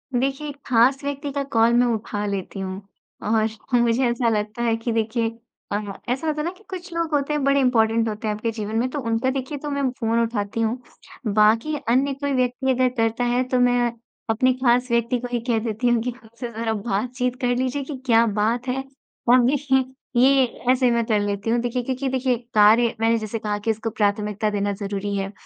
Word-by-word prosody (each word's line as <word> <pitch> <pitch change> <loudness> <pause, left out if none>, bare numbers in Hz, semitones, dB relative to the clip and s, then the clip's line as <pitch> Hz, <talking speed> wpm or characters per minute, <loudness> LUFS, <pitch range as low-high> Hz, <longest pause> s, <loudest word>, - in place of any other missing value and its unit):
देखिए, 270 +4 -1
एक 285 - -9
खास 255 +3 +3
व्यक्ति 285 0 -3
का 280 0 -2
कॉल 230 +1 +4
मैं 245 +1 +4
उठा 210 -1 -3
लेती 195 -1 -4
हूँ 190 +1 -5 0.5
और 220 0 +3 0.3
मुझे 240 +2 +2
ऐसा 235 0 +1
लगता 215 +1 -2
है 230 -1 +2
कि 230 +1 -3
देखिए 225 +1 0 0.4
अ, 205 - +1 0.3
ऐसा 265 +6 -1
होता 300 -1 0
है - - -3
ना 345 - -1
कि 430 - -21
कुछ 365 -1 -7
लोग 335 -1 -1
होते 285 +1 +1
हैं, 295 -2 0
बड़े 275 +1 +3
इम्पोर्टेंट 230 -3 +3
होते 215 +1 -4
हैं 210 - +1
आपके 225 +2 -2
जीवन 215 -1 -5
में 245 - +1
तो 290 +2 -4
उनका 230 +1 0
देखिए 265 +2 -3
तो 295 +1 -5
मैं 280 -2 0
फ़ोन 230 0 +1
उठाती 225 -1 -2
हूँ। 225 +3 0 0.6
बाकी 225 +8 +3
अन्य 270 +3 +3
कोई 280 0 -2
व्यक्ति 255 +1 +1
अगर 255 0 +2
करता 225 +1 +1
है 245 +1 +2
तो 255 -1 +1
मैं 245 -1 +3 0.4
अपने 255 +4 +3
खास 250 -1 +2
व्यक्ति 235 +1 +1
को 245 - -5
ही 240 - 0
कह 225 - +3
देती 230 +2 -1
हूँ 240 -1 +2
कि 250 - -2
खुदसे 235 0 -9
ज़रा 225 0 -2
बातचीत 245 +4 -2
कर 245 0 +1
लीजिए 260 +2 -1
कि 275 -1 -6
क्या 230 -1 +5
बात 225 +4 0
है? 265 +1 -1 0.5
अब 250 -1 +6
देखिए, 270 -1 +2 0.4
ये 270 0 +5 0.3
ऐसे 255 -1 +3
मैं 235 -1 +1
कर 215 -2 +2
लेती 205 +1 -2
हूँ। 235 +1 +2
देखिए, 245 0 -2
क्योंकि 260 +1 -2
देखिए 260 -1 +1 0.2
कार्य 220 +3 +5
मैंने 230 +1 +3
जैसे 220 0 -4
कहा 210 -1 -2
कि 225 +2 0
इसको 220 +1 -3
प्राथमिकता 210 0 0
देना 205 -1 -1
ज़रूरी 200 0 -3
है, 195 0 -2
235 Hz, 210 wpm, -23 LUFS, 220-260 Hz, 0.6 s, अब